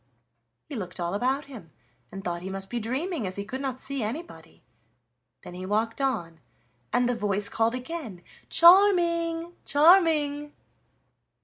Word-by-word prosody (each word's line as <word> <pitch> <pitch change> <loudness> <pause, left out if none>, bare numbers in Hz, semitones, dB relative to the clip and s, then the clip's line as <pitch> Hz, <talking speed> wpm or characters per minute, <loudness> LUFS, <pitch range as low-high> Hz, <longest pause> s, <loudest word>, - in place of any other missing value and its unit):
He 300 - -7
looked 185 -5 -6
all 175 +1 -2
about 260 +7 0
him 230 - -11 0.4
and 195 +1 -8
thought 175 -1 -3
he 185 - -6
must 195 0 -7
be 240 - -1
dreaming, 260 - -3
as 185 - -5
he 200 - -4
could 260 +6 -5
not 265 -2 -3
see 275 -1 -4
anybody. 210 - -7 0.8
Then - - -10
he 180 +1 -7
walked 220 +6 -1
on 175 -12 -2 0.5
and 245 - +2
the 245 - +1
voice 205 -3 -1
called 230 +2 +1
again: 255 - -7 0.3
"Charming, 340 -2 +4
Charming!" 295 -2 +3
250 Hz, 145 wpm, -26 LUFS, 195-305 Hz, 0.8 s, Charming